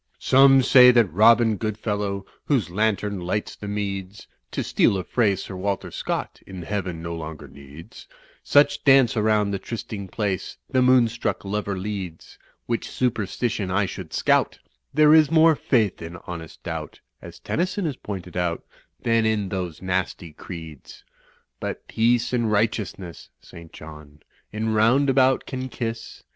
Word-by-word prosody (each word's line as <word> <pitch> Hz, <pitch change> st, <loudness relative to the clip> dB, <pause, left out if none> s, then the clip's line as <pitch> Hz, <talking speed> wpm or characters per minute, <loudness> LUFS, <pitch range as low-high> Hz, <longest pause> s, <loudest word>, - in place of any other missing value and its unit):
"Some 135 Hz, 0 st, +5 dB
say 125 Hz, 0 st, +8 dB
that 120 Hz, -6 st, +3 dB
Robin 110 Hz, +2 st, +5 dB
Goodfellow, 105 Hz, -2 st, -3 dB, 0.2 s
Whose 125 Hz, -, 0 dB
lantern 105 Hz, 0 st, 0 dB
lights 90 Hz, +4 st, -3 dB
the 105 Hz, -, -9 dB
meads, 100 Hz, -1 st, -4 dB, 0.2 s
(To -, -, -3 dB
steal 100 Hz, -, +2 dB
a 95 Hz, -, -3 dB
phrase 100 Hz, -1 st, 0 dB
Sir 95 Hz, -, -8 dB
Walter 100 Hz, +1 st, -3 dB
Scott -, -, -4 dB
In 95 Hz, -2 st, -8 dB
heaven 90 Hz, -4 st, -4 dB
no 85 Hz, 0 st, -4 dB
longer 80 Hz, -2 st, -7 dB
needs) 70 Hz, +8 st, -13 dB, 0.3 s
Such 145 Hz, +1 st, +3 dB
dance 135 Hz, -2 st, +5 dB
around 105 Hz, -2 st, +2 dB
the 100 Hz, -, -2 dB
trysting 105 Hz, -3 st, -6 dB
place 100 Hz, -2 st, -3 dB
^ -, -, -26 dB
The 130 Hz, -, +3 dB
moonstruck 120 Hz, -5 st, +2 dB
lover 100 Hz, 0 st, -3 dB
leads; 95 Hz, -4 st, -6 dB, 0.3 s
Which 115 Hz, -1 st, -3 dB
superstition 110 Hz, -3 st, -2 dB
I 95 Hz, +2 st, +1 dB
should 95 Hz, -, -8 dB
scout; -, -, +1 dB, 0.3 s
There 150 Hz, +1 st, +5 dB
is 155 Hz, -2 st, +6 dB
more 160 Hz, 0 st, +5 dB
faith 110 Hz, -9 st, 0 dB
in 85 Hz, +1 st, -7 dB
honest 80 Hz, -2 st, -9 dB
doubt, -, -, -6 dB, 0.2 s
(As -, -, -11 dB
Tennyson 185 Hz, +3 st, -2 dB
has 150 Hz, -5 st, -2 dB
pointed 95 Hz, -5 st, -8 dB
out) 90 Hz, -2 st, -1 dB, 0.4 s
Than 115 Hz, -1 st, +2 dB
in 105 Hz, -3 st, -1 dB
those 90 Hz, -3 st, -5 dB
nasty 90 Hz, -3 st, -3 dB
creeds. 80 Hz, -4 st, -10 dB, 0.6 s
But -, -, -6 dB
peace 120 Hz, +2 st, +1 dB
and 120 Hz, -3 st, +1 dB
righteousness 105 Hz, -5 st, -2 dB
(St. 85 Hz, -1 st, -14 dB
John) 75 Hz, -1 st, -13 dB, 0.3 s
In 110 Hz, +1 st, -2 dB
Roundabout 130 Hz, +4 st, +3 dB
can 130 Hz, 0 st, -5 dB
kiss. 115 Hz, -2 st, -6 dB
105 Hz, 150 wpm, -23 LUFS, 90-120 Hz, 0.6 s, say